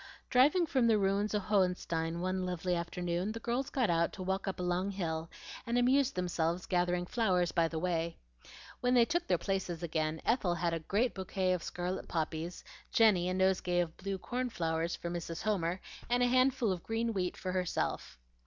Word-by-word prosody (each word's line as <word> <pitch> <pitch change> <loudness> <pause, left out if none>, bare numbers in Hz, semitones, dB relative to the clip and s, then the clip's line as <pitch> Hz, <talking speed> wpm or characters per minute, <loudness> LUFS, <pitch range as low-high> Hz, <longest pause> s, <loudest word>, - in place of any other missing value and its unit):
Driving 295 +8 +5
from 260 -6 +2
the 225 -2 +5
ruins 200 +1 +1
of 205 - 0
Hohenstein 180 -4 0
one 185 +1 -1
lovely 180 0 -1
afternoon, 175 +3 -2
the 230 - -5
girls 245 +4 -1
got 250 -9 +1
out 170 0 +2
to 185 - -6
walk 190 +1 -2
up 190 - -3
a - - -2
long 180 +2 0
hill, 165 -4 -3 0.4
and 235 +1 +1
amused 265 +2 +3
themselves 175 -1 -1
gathering 180 -1 +1
flowers 180 -5 +1
by 165 -1 +2
the 160 - -5
way. 170 -1 -1 0.6
When 250 +1 +2
they 240 -1 +6
took 345 +6 -1
their - - +3
places 185 -4 -2
again, 160 -1 -1
Ethel 200 -7 +2
had 170 0 0
a 165 - -1
great 210 +9 0
bouquet 190 -1 -1
of 180 - -1
scarlet 180 +2 -4
poppies, 160 +1 -3 0.3
Jenny 195 -6 +4
a - - 0
nosegay 185 -1 +2
of 170 -2 -1
blue 195 0 -4
corn 250 +6 -3
flowers 165 -4 -1
for 170 - -5
Mrs. 170 -1 -4
Homer, 185 -4 0 0.3
and 245 +1 +3
a - - +5
handful 255 -2 +3
of 180 -2 -3
green 225 +2 -1
wheat 180 -3 -2
for 185 - -3
herself. 180 - -2
185 Hz, 190 wpm, -32 LUFS, 170-220 Hz, 0.6 s, they